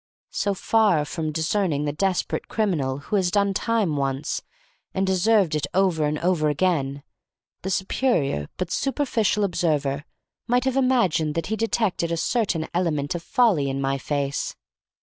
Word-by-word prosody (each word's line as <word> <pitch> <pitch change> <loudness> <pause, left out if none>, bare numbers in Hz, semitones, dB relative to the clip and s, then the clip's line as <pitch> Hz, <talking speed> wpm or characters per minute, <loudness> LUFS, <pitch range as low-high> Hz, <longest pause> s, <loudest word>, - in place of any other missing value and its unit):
So 200 -1 0
far 200 -7 +2
from 155 +1 -3
discerning 160 -2 0
the 145 - 0
desperate 185 +4 -1
criminal 160 -12 0
who 145 +9 -2
has 185 -2 +2
"done 200 +1 +2
time" 210 -7 0
once, 135 +1 -2 0.5
and 190 0 +1
deserved 190 -1 +3
it 150 -2 0
over 185 -5 +2
and 150 +1 0
over 170 -2 +1
again, 145 -4 0 0.6
the 190 - -4
superior 185 - 0
but 180 -1 -3
superficial 240 -7 0
observer 150 -6 0 0.4
might 245 +1 +2
have 265 -1 0
imagined 230 - +2
that 165 -1 -1
he - - +2
detected 220 -6 0
a 170 - 0
certain 175 -3 0
element 160 -4 0
of 175 - -4
folly 180 - +2
in 135 0 -2
my 135 0 0
face. 140 0 -2
175 Hz, 150 wpm, -24 LUFS, 150-205 Hz, 0.6 s, deserved